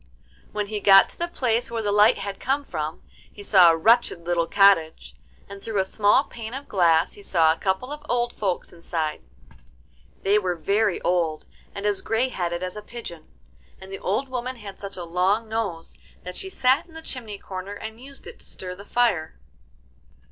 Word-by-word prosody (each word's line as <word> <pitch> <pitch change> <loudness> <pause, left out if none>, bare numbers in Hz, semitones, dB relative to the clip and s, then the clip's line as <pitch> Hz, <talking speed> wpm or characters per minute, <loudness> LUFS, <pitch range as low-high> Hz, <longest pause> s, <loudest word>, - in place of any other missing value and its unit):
When 210 -1 -2
he 210 +1 -4
got 195 -1 +7
to - - -13
the 345 - -1
place 245 -8 0
where 230 -1 -3
the 205 - 0
light 210 +2 +5
had 200 0 -5
come 275 +2 0
from, 155 - -5 0.3
he 205 - -11
saw 185 -4 +7
a 165 - +3
wretched 220 -2 +3
little 170 -1 +1
cottage, 195 -5 +3 0.3
and 200 0 -10
through 220 -1 -4
a 190 - +2
small 205 +6 +3
pane 230 -3 -8
of 275 +1 -7
glass 170 -4 +3
he 205 - -12
saw 165 -5 +3
a 165 - -12
couple 195 +8 -1
of 295 0 -7
old 240 0 0
folks 190 -4 -3
inside. 165 -2 -3 1.0
They 205 +2 +4
were 185 -3 -1
very 200 +5 +1
old, 165 -3 0 0.3
and 200 - -5
as 205 -2 +1
grey 230 +4 0
headed 175 -5 -3
as 185 +1 -4
a 210 - -6
pigeon, 210 -8 -9 0.5
and 190 0 -11
the 195 - -6
old 210 +9 -1
woman 255 0 -4
had 205 -5 -10
such 200 -1 -8
a 180 - -5
long 185 +6 +1
nose 215 -7 -4 0.3
that 180 0 -7
she 385 - -5
sat 265 -3 +2
in 325 - -18
the 320 - -9
chimney 225 -8 -6
corner 190 +1 -7
and 220 +3 -8
used 275 +1 -8
it 470 - -11
to - - -10
stir 180 -1 -7
the 195 +2 -11
fire. 205 - 0
200 Hz, 200 wpm, -24 LUFS, 180-235 Hz, 1.0 s, got